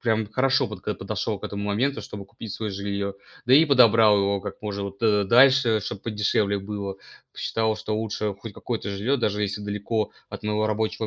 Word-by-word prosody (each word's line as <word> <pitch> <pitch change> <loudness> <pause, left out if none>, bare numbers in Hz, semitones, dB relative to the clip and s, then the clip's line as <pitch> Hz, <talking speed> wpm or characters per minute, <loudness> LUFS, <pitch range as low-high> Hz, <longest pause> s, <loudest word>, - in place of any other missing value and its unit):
Прям 110 -3 0
хорошо 130 +3 +2
подготов 105 -4 -5
подошёл - - -3
к - - -9
этому 100 0 -4
моменту, 120 +8 0
чтобы 100 -1 -8
купить 105 +1 -9
своё 110 0 -4
жильё. 100 0 -3 0.3
Да 125 - +3
и 155 +4 +7
подобрал 115 -7 +6
его 100 0 +1
как 100 - -8
можно, 100 -1 -3
вот, 100 +2 -8
э, 105 -2 +3
дальше, 125 0 +5
чтобы 100 0 -6
подешевле 105 -2 0
было. 100 -1 -5 0.4
Посчитал, 110 -1 -1
что 110 0 -3
лучше 110 -1 -2
хоть 100 +2 -9
какое-то 110 -1 -4
жильё, 105 +8 0
даже 105 -4 -1
если 100 0 -2
далеко 105 +2 -2 0.2
от - - -9
моего 105 0 0
рабочего 110 +1 -1
105 Hz, 190 wpm, -25 LUFS, 100-115 Hz, 0.4 s, и